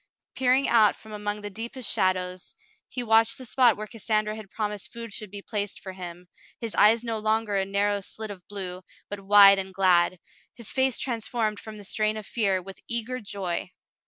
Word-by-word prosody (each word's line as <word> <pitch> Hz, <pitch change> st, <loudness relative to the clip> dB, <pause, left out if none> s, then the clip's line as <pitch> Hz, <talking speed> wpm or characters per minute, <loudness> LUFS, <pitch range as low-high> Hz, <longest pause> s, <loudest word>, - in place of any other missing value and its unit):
Peering 260 Hz, +1 st, +3 dB
out 220 Hz, -3 st, +5 dB
from 220 Hz, -, -13 dB
among 210 Hz, 0 st, -3 dB
the 205 Hz, -, -5 dB
deepest 235 Hz, +3 st, -4 dB
shadows, 185 Hz, -1 st, 0 dB, 0.3 s
he 250 Hz, -, -4 dB
watched 225 Hz, 0 st, +4 dB
the 255 Hz, -, -8 dB
spot 245 Hz, -1 st, +4 dB
where 215 Hz, -, -5 dB
Cassandra 215 Hz, -1 st, -1 dB
had 215 Hz, -3 st, -10 dB
promised 210 Hz, -1 st, -4 dB
food 230 Hz, -2 st, -7 dB
should 215 Hz, -1 st, -6 dB
be 200 Hz, +1 st, -8 dB
placed 205 Hz, -2 st, -3 dB
for 190 Hz, -, -8 dB
him, 180 Hz, -1 st, -9 dB, 0.3 s
his 230 Hz, -2 st, -3 dB
eyes 225 Hz, +3 st, +5 dB
no 225 Hz, -2 st, -2 dB
longer 215 Hz, -1 st, 0 dB
a 195 Hz, -1 st, +1 dB
narrow 200 Hz, +1 st, 0 dB
slit 215 Hz, +2 st, -5 dB
of 190 Hz, -3 st, -10 dB
blue, 185 Hz, -3 st, -5 dB, 0.3 s
but 205 Hz, -, -5 dB
wide 195 Hz, 0 st, +7 dB
and 190 Hz, 0 st, -5 dB
glad, 185 Hz, -1 st, +3 dB, 0.4 s
his 235 Hz, -4 st, -4 dB
face 260 Hz, -1 st, +2 dB
transformed 225 Hz, -3 st, -1 dB
from 215 Hz, -1 st, -9 dB
the 205 Hz, -, -10 dB
strain 215 Hz, +2 st, 0 dB
of 215 Hz, -, -7 dB
fear 195 Hz, -5 st, 0 dB
with 195 Hz, +1 st, -10 dB
eager 235 Hz, +2 st, -2 dB
joy. 195 Hz, -5 st, -4 dB
210 Hz, 190 wpm, -26 LUFS, 195-225 Hz, 0.4 s, wide